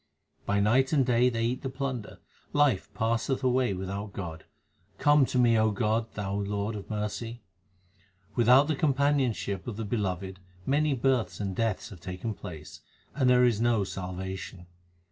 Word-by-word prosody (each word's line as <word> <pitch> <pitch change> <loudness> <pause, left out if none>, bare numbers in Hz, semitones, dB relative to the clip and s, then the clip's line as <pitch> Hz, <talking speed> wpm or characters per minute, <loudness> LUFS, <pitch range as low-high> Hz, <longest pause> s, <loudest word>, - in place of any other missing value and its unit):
2 - - -39
By 100 0 +2
night 130 +6 +3
and 135 -4 +4
day 125 0 +4
they 115 -1 -1
eat 125 +2 -1
the 135 - -3
plunder; 130 -4 -4 0.4
life 145 -9 +2
passeth 115 +4 0
away 125 -5 +2
without 100 +2 -5
God; 80 -5 -6 0.5
come 145 -1 +4
to - - -2
me, 120 -2 +4
O 110 0 +3
God, 110 +2 0
Thou 100 -2 -3
Lord 100 +1 -2
of 100 - -8
mercy. 110 +2 -4 0.9
Without 125 +6 +5
the 155 - +1
companionship 135 - 0
of 110 -4 -5
the 110 - -3
Beloved 95 -3 -3 0.3
many 145 +1 +2
births 130 -1 0
and 100 -2 -3
deaths 115 -1 -1
have 95 -5 -11
taken 90 +6 -5
place, 80 -7 -10 0.3
and 130 -3 +2
there 125 0 +6
is 115 -3 +2
no 115 -3 +3
salvation. 95 0 -6
115 Hz, 165 wpm, -28 LUFS, 100-130 Hz, 0.9 s, there